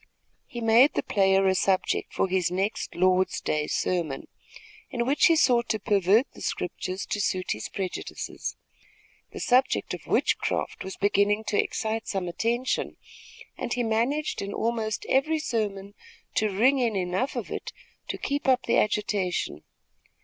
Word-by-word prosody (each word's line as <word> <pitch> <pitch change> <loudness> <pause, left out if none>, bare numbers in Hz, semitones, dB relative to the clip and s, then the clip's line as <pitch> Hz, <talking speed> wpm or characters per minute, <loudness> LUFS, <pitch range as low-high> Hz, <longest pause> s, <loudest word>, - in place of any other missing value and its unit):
He 240 - -7
made 230 +5 +5
the - - 0
player 195 -1 +3
a 190 - +4
subject 190 0 +1
for - - 0
his 185 -2 +1
next 195 +4 -2
Lord's 185 +1 +2
day 150 0 -1
sermon, 165 -7 -1 0.6
in 235 -1 -1
which 275 +4 +4
he 330 - +5
sought 240 -6 +3
to 220 -1 0
pervert 205 +4 +3
the - - -14
scriptures 185 +1 -3
to 205 - -2
suit 185 -2 -1
his 105 - -3
prejudices. 190 -2 -5 0.8
The - - -8
subject 255 +2 +2
of - - -8
witchcraft - - 0
was 190 - -7
beginning 205 +1 +2
to 205 - +3
excite 220 0 -3
some 190 -3 -2
attention, 235 +8 -1 0.6
and - - -3
he 245 - 0
managed 235 +7 0
in 200 0 -4
almost 225 -2 -1
every 310 +4 +2
sermon 205 -8 -3 0.4
to 215 - +1
ring 250 +8 +3
in 235 -4 +1
enough 185 +7 -1
of - - -4
it - - -5 0.4
to - - -3
keep 285 0 -2
up 255 -1 +4
the - - +2
agitation. 195 - -1
210 Hz, 155 wpm, -26 LUFS, 190-240 Hz, 0.8 s, made